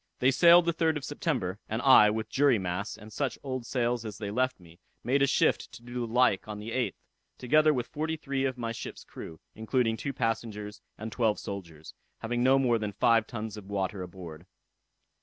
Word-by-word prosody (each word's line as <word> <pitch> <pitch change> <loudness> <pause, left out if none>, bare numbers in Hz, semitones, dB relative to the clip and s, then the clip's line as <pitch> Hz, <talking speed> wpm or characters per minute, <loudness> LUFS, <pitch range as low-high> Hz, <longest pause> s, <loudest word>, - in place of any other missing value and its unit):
"They 130 +2 +3
sailed 170 +4 +7
the 170 - +1
3rd 160 -1 +1
of 140 - -6
September; 125 - -2
and 110 - -1
I, 130 -6 +8
with 110 +1 -2
jury 140 -3 +3
masts, 95 +2 -3
and 110 0 -13
such 140 -3 -2
old 130 -3 -4
sails 120 -2 0
as 105 -2 -7
they 105 -2 -5
left 130 +2 0
me, 85 -1 -17 0.2
made 135 +3 +1
a 140 - +5
shift - - +1
to 115 - -12
do 120 0 -4
the - - -10
like 125 -6 +3
on 105 -1 -5
the 105 +2 -7
8th, 125 +1 -1 0.4
together 155 +4 +4
with 125 -5 -1
forty 160 +2 -3
three 140 -3 -2
of 130 -1 -2
my 115 -2 -3
ship's 115 - -7
crew, 80 - -10
including 115 0 0
two 140 - -3
passengers 110 -4 -3 0.2
and 110 +1 -6
twelve 110 -2 +1
soldiers; 85 -6 -8 0.2
having 120 +1 -2
no 130 +2 +5
more 120 -4 +2
than 105 -1 -3
five 115 +1 +3
tuns 110 -2 -6
of 100 -2 -10
water 95 -1 -2
aboard. 90 -2 -9
115 Hz, 205 wpm, -29 LUFS, 105-130 Hz, 0.4 s, I